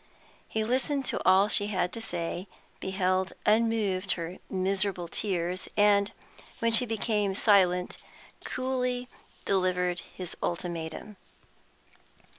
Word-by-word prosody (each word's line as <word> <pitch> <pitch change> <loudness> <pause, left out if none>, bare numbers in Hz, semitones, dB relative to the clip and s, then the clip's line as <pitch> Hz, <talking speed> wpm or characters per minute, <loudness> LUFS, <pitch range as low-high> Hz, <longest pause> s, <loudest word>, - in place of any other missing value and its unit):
He 220 - -1
listened 265 +4 0
to - - -1
all 190 +2 +6
she 205 -1 +3
had 180 -3 -1
to 230 - -4
say, 175 -2 -3 0.3
beheld 190 0 0
unmoved 210 -3 +2
her 170 +1 -6
miserable 190 -1 0
tears, 180 -1 -2
and, 205 0 +4 0.5
when 230 0 +1
she 245 +2 +4
became 210 -3 0
silent, 185 -4 +3 0.5
coolly 250 -1 -2 0.4
delivered 180 -2 +1 0.2
his 180 -2 -5
ultimatum. 175 +3 -4
195 Hz, 105 wpm, -29 LUFS, 180-220 Hz, 0.5 s, all